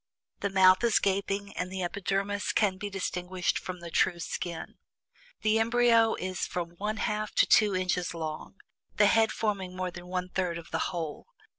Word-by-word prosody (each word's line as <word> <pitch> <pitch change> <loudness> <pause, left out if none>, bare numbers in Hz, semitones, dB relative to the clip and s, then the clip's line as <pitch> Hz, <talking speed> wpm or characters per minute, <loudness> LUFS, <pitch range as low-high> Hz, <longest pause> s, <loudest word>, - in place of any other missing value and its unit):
The 200 - -1
mouth 185 +1 +5
is 235 -2 +4
gaping, 200 +1 -1
and 180 0 -3
the 190 -1 -3
epidermis 195 +3 -1
can 200 -3 +2
be 205 +2 -4
distinguished 180 -1 -2
from 180 -1 -7
the 170 -1 -8
true 175 +1 +2
skin. 170 0 -5 0.6
The 215 +1 +3
embryo 230 -1 +4
is 185 0 -3
from 175 -2 -4
one 210 +2 -2
half 210 0 -2
to - - +5
two 210 -3 +4
inches 180 -1 -1
long, 160 +2 -5 0.4
the 205 - +6
head 220 +1 +4
forming 195 -4 -2
more 185 -1 -3
than 175 0 -10
one 180 0 -3
third 180 -2 -1
of 170 - -11
the 165 - -1
whole. 165 - -5
185 Hz, 175 wpm, -29 LUFS, 180-205 Hz, 0.6 s, the